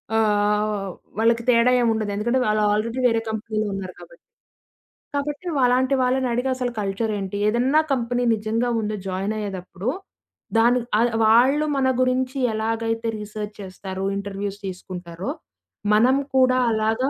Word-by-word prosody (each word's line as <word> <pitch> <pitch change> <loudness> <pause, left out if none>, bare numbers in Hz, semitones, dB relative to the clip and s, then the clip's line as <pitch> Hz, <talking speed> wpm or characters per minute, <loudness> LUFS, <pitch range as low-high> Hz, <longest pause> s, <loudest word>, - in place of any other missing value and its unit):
ఆహ్, 210 -2 +1 0.3
వాళ్ళకి 230 +1 +3
తేడా 240 0 +5
ఏముండదు. 220 -3 +1
ఎందుకంటే, 240 +5 +1
వాళ్ళు 215 0 +2
ఆల్రెడీ 230 +4 -1
వేరే 230 -2 +3
కంపెనీ‌లో 220 0 -2
ఉన్నారు 190 -2 -5
కాబట్టి. - - -15 0.9
కాబట్టి, 295 +4 -3
వలాంటి 255 +2 +3
వాళ్ళనడిగి 255 0 0
అసలు 250 -1 -2
కల్చర్ 205 +2 -1
ఏంటి? 195 +1 -4
ఏదన్నా 250 +7 +3
కంపెనీ 245 0 -1
నిజంగా 220 +3 -1
ముందు 215 -1 -2
జాయిన్ 190 +3 -2
అయ్యేదప్పుడు, 195 +1 -4 0.7
దాన్ని 240 +2 +4 0.2
ఆహ్, 240 0 +3
వాళ్ళు 255 +7 +5
మన 265 -1 +2
గురించి 255 +1 0 0.2
ఎలాగైతే 225 +1 -1
రిసర్చ్ 210 0 -6
చేస్తారో, 190 0 -6
ఇంటర్వ్యూస్ 200 0 -5
తీసుకుంటారో, 180 +3 -6 0.6
మనం 245 +5 +5 0.2
కూడా 255 0 +4
అలాగా 220 +4 +1
225 Hz, 125 wpm, -23 LUFS, 205-250 Hz, 0.9 s, తేడా